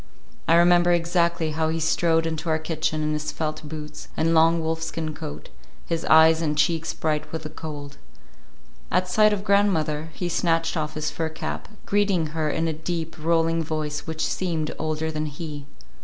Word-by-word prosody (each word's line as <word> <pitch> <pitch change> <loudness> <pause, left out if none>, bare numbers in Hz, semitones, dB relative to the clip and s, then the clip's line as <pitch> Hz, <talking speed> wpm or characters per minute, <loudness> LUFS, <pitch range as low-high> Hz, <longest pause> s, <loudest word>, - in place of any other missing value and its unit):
I 165 - +5
remember 175 +1 +5
exactly 170 -1 +1
how 160 +1 0
he 165 +1 -1
strode 165 0 +2
into 160 0 -3
our 155 - +3
kitchen 155 -1 -2
in 155 0 0
his 150 0 -2
felt 155 -1 -3
boots 150 0 -8
and 165 +1 +2
long 165 +1 +5
wolfskin 160 -1 -3
coat, 75 - -8 0.4
his 165 -1 -2
eyes 160 +1 +6
and 150 -2 -1
cheeks 165 +1 +1
bright 155 -1 -2
with 160 -1 -4
the 155 - -6
cold. 145 -3 -8 0.9
At 180 +1 +1
sight 215 +4 +4
of 200 -1 -1
grandmother, 165 -7 +2
he 180 - -3
snatched 165 -1 +1
off 155 -1 -2
his 155 0 -2
fur 160 -1 -2
cap, 160 - -5 0.2
greeting 200 -5 +2
her 155 -2 0
in 160 +2 0
a 160 - 0
deep, 165 +1 -4
rolling 165 0 +2
voice 150 -1 -3
which 160 0 -2
seemed 165 -4 -2
older 155 0 -1
than 155 0 -2
he. 145 -1 -7
160 Hz, 175 wpm, -24 LUFS, 155-165 Hz, 0.9 s, eyes